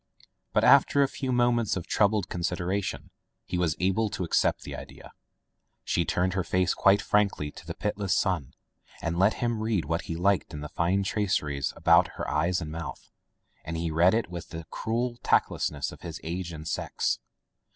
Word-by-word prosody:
'* - - -51
But - - +4
after 140 - +6
a - - +2
few 135 -1 -4
moments 120 -4 +2
of 90 - -5
troubled 105 -1 +2
consideration 90 +2 -2 0.3
he 90 - -2
Was 85 -3 +1
able 95 +5 +1
to 95 - -3
accept 85 - +1
the - - -6
idea. - - -11 0.7
She 85 - 0
turned 90 +1 0
her 95 -1 0
face 90 -1 +1
quite 100 +1 +4
frankly 100 -8 +1
to - - -13
the - - -5
pitiless 100 -2 -1
sunlight, 80 -9 -1 0.5
and 85 +1 -1
let 95 +3 +4
him 120 -2 -1
read 110 -8 0
what 80 +2 -2
he 80 - -4
liked 90 -1 +1
in 75 - -6
the 75 - -6
fine 95 +4 +1
traceries 85 -9 0
about - - +4
her - - -3
eyes 85 +4 +1
and 75 -2 -5
mouth. 80 +1 -7 0.5
And 80 +1 -4
he 85 0 -2
read 85 +5 +4
it 115 - 0
with 85 -2 -7
the 80 0 -7
cruel 120 +2 -2
tactlessness 70 -2 +1
of - - -13
his 85 -2 -6
age 85 +1 -4
and 80 -1 -8
sex. - - -1
90 Hz, 185 wpm, -27 LUFS, 85-105 Hz, 0.7 s, after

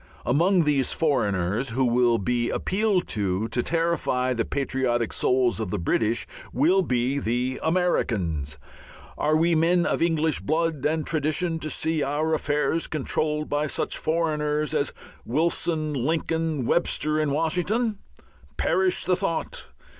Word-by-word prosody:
Among 170 +7 +3
these 145 -3 +1
"foreigners" 110 - 0
who 130 +3 +1
will 120 -1 +3
be 120 +3 0
appealed 195 -1 0
to 100 0 -1
to 120 - 0
terrify 160 -6 0
the 115 -2 -1
patriotic 130 -4 -1
souls 125 -2 +1
of 110 -4 -3
the 105 - -2
British 110 +6 0 0.3
will 170 +9 +3
be 130 -3 0
the 125 +2 -1
"Americans." 95 - 0 0.6
Are 155 +1 +1
we 170 +2 +2
men 170 +2 +3
of - - 0
English 160 -2 +1
blood 160 -2 0
and 155 0 -1
tradition 160 +2 0
to 155 - -4
see 160 0 0
our 150 +3 0
affairs 150 +2 0
controlled 150 +1 -1
by 145 +1 0
such - - -2
"foreigners" 150 -2 0
as 140 - 0 0.3
Wilson, 155 +2 0
Lincoln, 160 +1 -1
Webster 155 0 +1
and 155 -2 0
Washington? 180 - 0 0.6
Perish 190 -1 +1
the 180 - +3
thought! 180 -3 -3
150 Hz, 135 wpm, -25 LUFS, 125-165 Hz, 0.6 s, Among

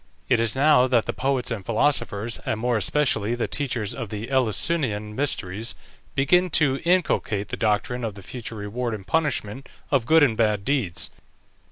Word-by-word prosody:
It 125 -3 +4
is 115 0 +1
now 135 -2 +5
that 120 -3 +2
the - - -2
poets 130 -1 -1
and 110 -4 -3
philosophers, 115 -1 0
and 110 - -2
more 120 +1 0
especially 110 0 +1
the 120 - -2
teachers 120 -7 -2
of 115 -6 -6
the 110 +1 -5
Eleusinian 120 -3 0
Mysteries, 115 -6 -2 0.4
begin 180 +7 +3
to 140 -3 +2
inculcate 165 - +1
the - - -3
doctrine 115 +3 0
of 110 -3 -3
the 100 - -11
future 115 +1 -7
reward 110 +3 -3
and 95 -3 -10
punishment 135 -6 -1 0.2
of 130 -5 +2
good 160 -1 +6
and 120 -6 +3
bad 105 -3 +1
deeds. 125 -12 -1
120 Hz, 170 wpm, -24 LUFS, 105-135 Hz, 0.4 s, good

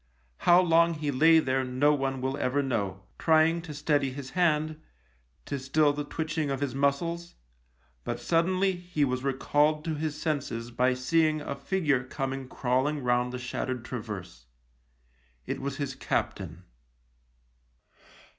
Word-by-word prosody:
How 175 +1 +8
long 170 -1 +4
he 150 -1 -2
lay 160 +5 +6
there 130 -4 +1
no 130 +4 +2
one 135 -2 -1
will 135 +1 -1
ever 140 +1 0
know, 100 -7 -2 0.2
trying 160 +1 +4
to 165 -2 -8
steady 145 -1 +1
his 135 0 -7
hand, 155 -3 +1 0.6
to 140 - -3
still 145 +3 +2
the 145 0 -3
twitching 155 0 -2
of 135 - -1
his 140 -3 -2
muscles; 165 +5 -1 0.7
but - - -3
sud 165 0 +2
denly 185 0 +1
he 175 -5 0
was 130 -1 -2
recalled 150 +3 +1
to 165 - -1
his 150 0 -3
senses 130 -7 -2
by 125 +2 +2
seeing 155 +4 +2
a 145 - -4
figure 145 -3 0
coming 135 0 -4
crawling 135 +3 0
round 125 0 +1
the 125 - -4
shattered 125 0 -4
traverse. 100 - -7 1.0
It - - -4
was 140 0 -3
his 140 -2 -3
captain. 90 - -3
140 Hz, 145 wpm, -28 LUFS, 130-155 Hz, 1.0 s, How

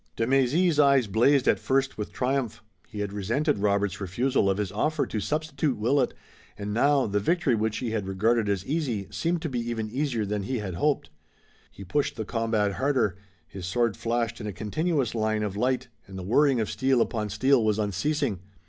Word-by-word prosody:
De 115 - 0
Mézy's 140 +6 +2
eyes 140 -3 +5
blazed 125 +7 +3
at - - +4
first 135 0 0
with 105 - -5
triumph. 130 -2 -2 0.2
He 105 - -6
had 100 -1 -3
resented 115 - 0
Robert's 100 -1 0
refusal 100 +4 +1
of 95 - +1
his 105 -3 -2
offer 155 -1 0
to 110 - -3
substitute 150 +4 -1
Willet, 125 +4 +1 0.4
and 105 0 -4
now, 140 +4 +3
the 105 -1 0
victory 165 - +1
which 110 -1 0
he 120 -3 -3
had 105 -4 -2
regarded 105 +3 +1
as 100 -2 -1
easy 130 - -2
seemed 170 0 -1
to - - -1
be 125 -3 -2
even 115 -2 -3
easier 125 -4 -1
than 105 0 -2
he 125 +6 -2
had 100 -4 -4
hoped. 140 - 0 0.6
He 100 - -11
pushed 140 +10 -1
the 110 - -4
combat 110 -2 0
harder. 125 -3 +1 0.3
His 90 +1 -7
sword 115 +2 +1
flashed 115 0 -2
in 105 - -5
a 105 - -4
continuous 140 - -1
line 110 -1 0
of 100 -2 -3
light, 125 +4 0 0.2
and 95 -1 -9
the 95 - -5
whirring 130 +6 +3
of 110 - -1
steel 130 -1 +2
upon 110 -2 0
steel 125 +4 +3
was 110 -1 +2
unceasing. 105 - -1
115 Hz, 195 wpm, -26 LUFS, 105-135 Hz, 0.6 s, eyes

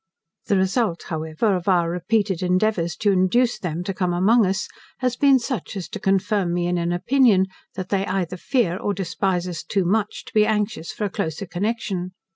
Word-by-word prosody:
The 200 - +3
result, 190 -1 0
however, 160 +6 0
of 180 0 -4
our 175 -3 +3
repeated 190 +1 0
endeavours 180 -1 +1
to 205 - +1
induce 215 +5 +2
them 175 -2 -3
to 195 - -3
come 180 -2 -1
among 205 +5 +4
us 190 +2 -1 0.3
has 250 -1 0
been 275 0 +5
such 235 - -4
as 185 - -5
to 210 - -6
confirm 195 -2 +1
me 175 0 0
in 175 0 0
an 170 0 -1
opinion, 215 +1 +3 0.3
that 185 0 -5
they 195 -1 0
either 185 -1 -2
fear 190 -4 0
or 205 +1 -2
despise 180 0 -1
us 175 -3 -4
too 195 -3 -1
much, 205 +3 0
to - - -13
be 215 - +5
anxious 210 -5 -1
for - - -5
a - - -1
closer 160 +3 -3
connection. 185 0 -3
190 Hz, 195 wpm, -23 LUFS, 175-215 Hz, 0.3 s, been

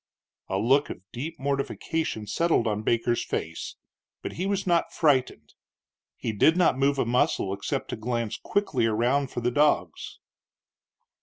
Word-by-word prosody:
A 95 - 0
look 135 +8 +3
of 90 - -8
deep 155 +7 -6
mortification 140 -2 -2
settled 165 0 +1
on 105 -1 -1
Baker's 120 +2 +1
face, 80 +1 -4 0.5
but - - -4
he 185 +3 -3
was 200 -1 -1
not 175 -2 +2
frightened; 140 -5 +1 0.6
he 115 - -3
did 160 - +4
not 180 -7 +4
move 140 +1 +2
a 135 - +1
muscle, 115 -5 +1
except 115 +7 -3
to - - -3
glance 115 -1 -3
quickly 145 - 0
around 125 +5 +1
for 120 - -4
the 120 +1 +1
dogs. 150 +3 +1
130 Hz, 150 wpm, -26 LUFS, 115-150 Hz, 0.6 s, did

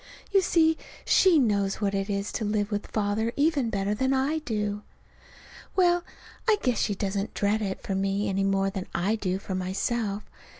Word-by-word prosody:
You 395 -1 +5
see, 320 -3 +3 0.3
she 370 -4 +5
knows 200 -7 +2
what 200 -2 0
it 195 +1 -1
is 200 0 -2
to 225 - -3
live 210 0 0
with 205 0 -2
Father 215 +2 0
even 285 -5 +2
better 200 -1 0
than 260 +5 +1
I 280 +4 +1
do. 210 -6 -2 0.9
Well, 350 -2 +4 0.5
I 430 - +5
guess 250 -2 +1
she 205 - 0
doesn't 195 +1 -2
dread 210 +2 +1
it 195 -2 -3
for 195 - -3
me 195 +2 0
any 195 0 0
more 195 0 +1
than 190 -1 -5
I 195 +6 +1
do 190 -4 -1
for 195 0 -6
myself. 200 +3 -1
205 Hz, 180 wpm, -27 LUFS, 195-250 Hz, 0.9 s, You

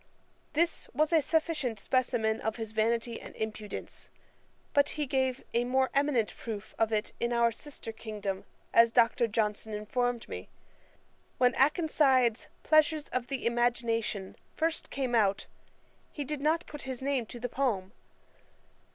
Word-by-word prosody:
This 335 +2 0
was 310 +2 +2
a 320 - +6
sufficient 300 -7 0
specimen 230 -2 +1
of 220 0 -1
his 225 -2 -5
vanity 230 +1 0
and - - -10
impudence. 215 -1 -5 0.6
But 285 0 +4
he 300 - 0
gave 260 -1 0
a 235 - +3
more 260 +1 +1
eminent 275 -6 +2
proof 215 -3 -6
of 225 0 +2
it 215 0 -1
in 235 0 0
our 235 -1 +3
sister 275 -1 -7
kingdom, 210 -3 -5 0.3
as 230 0 +7
Dr. 235 0 +3
Johnson 215 -1 -1
informed 240 +3 -1
me. - - -7 0.9
When 250 -1 +4
Akenside's 270 -5 +3 0.2
Pleasures 310 0 +3
of 250 -1 -2
the 270 -2 -4
Imagination 235 -4 0 0.2
first 325 +1 -1
came 260 -3 -2
out, 205 -4 +3 0.7
he 290 - -4
did 290 0 -4
not 320 +4 +2
put 295 -1 -8
his 260 -1 -5
name 270 -4 0
to 240 - -8
the 245 - -2
poem. 230 -8 -1
245 Hz, 145 wpm, -30 LUFS, 225-280 Hz, 0.9 s, as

